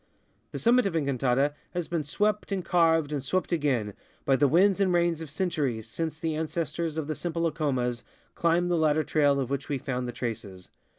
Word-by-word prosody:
The - - -5
summit 240 -1 +4
of 180 - -3
Encantada 140 -1 +1 0.2
has 175 -2 -2
been 170 -3 -1
swept 210 +8 -1
and 190 -3 -2
carved 165 -3 +3
and 145 -3 -2
swept 185 +8 -1
again 135 -11 0 0.3
by 135 - +4
the 140 +2 +4
winds 190 +6 +4
and 190 -2 +3
rains 170 -2 +1
of 160 - -7
centuries 145 - -2
since 160 +6 -4
the 160 -1 -2
ances 160 +1 -3
tors 165 -2 -2
of 160 - -1
the 155 - -2
simple 165 +1 -3
Acomas 130 -7 -1 0.3
climbed 170 +1 +1
the 170 - +2
ladder 155 0 +3
trail 145 -3 +2
of 130 -1 -2
which 140 0 -3
we 145 - 0
found 125 -1 -3
the - - -3
traces. 105 -6 -6
155 Hz, 200 wpm, -27 LUFS, 135-170 Hz, 0.3 s, summit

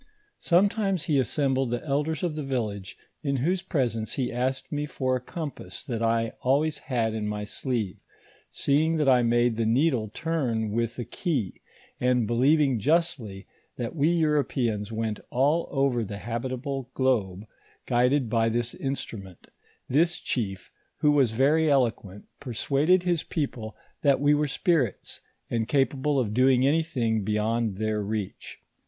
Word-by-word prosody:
Sometimes 195 0 +2
he 145 -3 +2
assembled 135 -1 +1
the 120 +3 -3
elders 150 +2 -1
of 170 -4 -1
the 155 - -3
village, 110 -8 -3 0.2
in 140 -2 -1
whose 175 +8 0
presence 125 - -2
ho 130 -3 -1
asked 130 +2 -2
mo 150 0 -2
for 130 -3 -1
a 125 - -3
compass 145 - -7
that 115 -3 -3
I 115 0 +1
always 145 +4 +1
had 115 -5 -1
in 110 -1 -2
my 105 0 -3
sleeve; 110 -2 -3 0.5
seeing 155 +4 +1
that 150 -2 +1
I 125 -2 +6
made 120 0 +2
the 115 - +1
needle 125 -2 +2
turn 125 -9 -1
with 115 +1 -1
a 120 - -4
key, 125 - -3 0.4
and 125 -2 +2
believing 130 +3 +3
justly 125 - 0 0.3
that 120 +5 -4
we 150 +1 +3
Europeans 135 -10 0
went 110 -1 -2
all 145 +7 +2
over 135 -4 +1
the 100 -1 -6
habitable 130 +4 -4
globe, 105 -7 0 0.4
guided 125 +2 +2
by 115 0 +2
this 120 +1 -1
instrument, 115 - -6 0.4
this 165 +6 +2
chief, 95 -6 -3 0.3
who 150 - +5
was 140 -5 +4
very 145 +8 +3
eloquent, 115 -7 0
persuaded 140 +7 +1
his 175 -3 +1
people 125 -8 -4 0.2
that 140 -3 +3
we 145 +1 +4
were 150 0 +2
spirits, 140 - 0 0.3
and 115 -2 0
capable 135 +1 +1
of 110 -5 -1
doing 130 +1 +4
anything 135 -8 +1
beyond 110 +1 0
their 110 +1 -1
reach. 105 -1 -5
130 Hz, 150 wpm, -26 LUFS, 115-145 Hz, 0.5 s, I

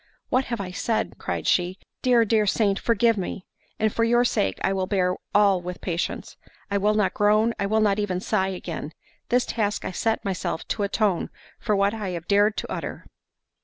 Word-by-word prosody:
"What 260 +1 +2
have 235 -2 -3
I 185 -2 -4
said?" 220 +4 -2
cried - - -3
she; 180 +1 +1 0.2
"Dear, 245 -2 +4
dear 215 -1 +2
saint, 200 -1 +2
forgive 230 -1 +2
me; 185 0 -5 0.3
and 220 -1 +1
for 230 - +1
your 240 +1 +3
sake 95 - 0
I 195 - +2
will 190 -1 -1
bear 185 -2 +1 0.2
all 200 -3 +5
with 180 0 -6
patience—I 185 +3 -4
will 210 +2 +2
not 210 -3 +2
groan, 215 +2 +3
I 200 - 0
will 220 +2 +2
not 205 -1 +2
even 190 -3 -1
sigh 190 0 0
again—this 180 +6 -4
task 210 -3 -1
I - - -2
set 225 +4 -1
myself 190 -3 -3
to - - -1
atone 200 -2 0 0.3
for 210 - 0
what 200 +1 +2
I 215 -4 -4
have 165 - -10
dared 205 +1 +3
to - - -4
utter." - - -5
205 Hz, 190 wpm, -25 LUFS, 190-220 Hz, 0.3 s, all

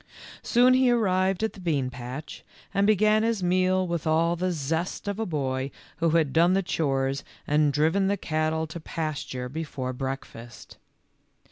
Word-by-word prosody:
Soon 250 +1 +4
he 260 0 +4
arrived 190 -4 +2
at 220 - 0
the 200 - -13
bean 145 -8 -1
patch, 125 +4 -8 0.3
and 200 0 +2
be 215 - +5
gan 215 +2 +3
his 225 -3 0
meal 185 +1 +2
with 170 -3 -3
all 165 +2 +2
the 185 +2 -1
zest 160 +5 -3
of 200 +1 -2
a 225 - -1
boy 135 -4 -2 0.3
who 165 +1 +2
had 150 -5 +1
done 170 +3 +4
the 195 +1 +2
chores 135 -5 -1 0.2
and 150 0 +3
driven 160 +7 +2
the 200 +1 +1
cattle 155 -1 -1
to 160 +2 -8
past 155 -2 -4
ure 125 0 -3
before 135 -3 -4
breakfast. 125 -3 -7
165 Hz, 170 wpm, -26 LUFS, 140-190 Hz, 0.3 s, be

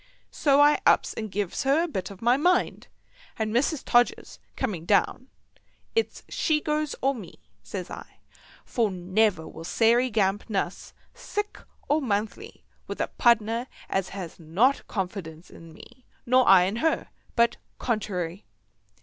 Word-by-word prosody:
So 280 -2 +3
I 295 +1 +5
ups - - +3
and 220 -1 -5
gives 200 -1 -2
her 280 +4 +3
a - - -1
bit 190 - -4
of 200 +1 -11
my 240 +2 +5
mind; 355 +6 +1 0.5
and 220 -1 -2
Mrs. 275 +4 0
Todgers 240 0 +1 0.2
coming 205 -11 -3
down, 210 +7 +1 0.7
"It's 455 0 -1
she 310 -1 +1
goes 300 0 -1
or 270 +1 +3
me," 215 -9 -10 0.2
says 180 - -6
I, - - -10 0.5
"for 230 -5 0
never 185 -1 0
will 160 - -10
Sairey 235 +8 +3
Gamp 205 -1 0
nuss, 195 -3 -3 0.2
sick 415 0 -5 0.3
or 305 +2 +2
monthly, 225 - -3 0.2
with - - -6
a - - -1
pardner 235 0 +2 0.2
as 190 -1 0
has 185 -4 -7
not 190 - +1
confidence 180 -5 -5
in 165 -1 -13
me, 250 +10 -16 0.2
nor 255 +1 +4
I 190 -2 +8
in 195 +5 -1
her, 320 +6 0 0.3
but 235 -1 +3 0.2
contrary." 195 -6 -3
220 Hz, 150 wpm, -26 LUFS, 190-265 Hz, 0.7 s, I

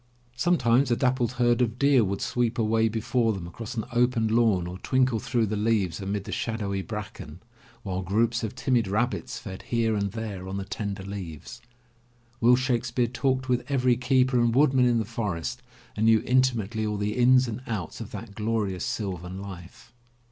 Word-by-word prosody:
Sometimes 130 -4 +3
a 120 - +3
dappled 125 -1 +1
herd 120 -1 +2
of 115 -1 0
deer 140 -3 +4
would 100 -1 -2
sweep 120 0 0
away 110 0 +2
before 115 +1 0
them 95 -4 -6
across 115 +8 -7
an 110 - -2
open 120 -2 +2
lawn 110 -6 +3
or 90 +1 -7
twinkle 130 -2 +1
through 120 +1 0
the 105 +1 -2
leaves 105 -4 0
amid 100 +1 -2
the - - -8
shadowy 100 -4 -2
bracken, 105 -6 -7 0.4
while 95 -2 -3
groups 115 +5 +1
of 110 +2 -4
timid 125 -4 +1
rabbits 110 +6 -1
fed 95 -2 -8
here 115 -2 0
and 100 -1 -1
there 105 -5 -5
on 95 +1 -4
the 100 - -4
tender 100 0 -4
leaves. 100 +3 -7 0.8
Will 120 +2 +6
Shake 125 -2 0
speare 120 0 0
talked 130 +2 -1
with 125 -1 +1
every 130 -3 +3
keeper 130 0 +2
and 120 -1 +2
woodman 130 -2 +4
in 120 -1 +3
the 110 - 0
forest 105 +1 -3 0.3
and 110 +1 +1
knew 110 -1 +5
intimately 120 -4 +1
all 105 -1 -1
the 105 +1 -2
ins 125 +1 +5
and 115 +1 -5
outs 100 -8 -4
of - - -7
that 115 -3 -8
glorious 105 -3 -1
sylvan 95 -7 -4
life. 95 +3 -10
115 Hz, 185 wpm, -26 LUFS, 100-125 Hz, 0.8 s, Will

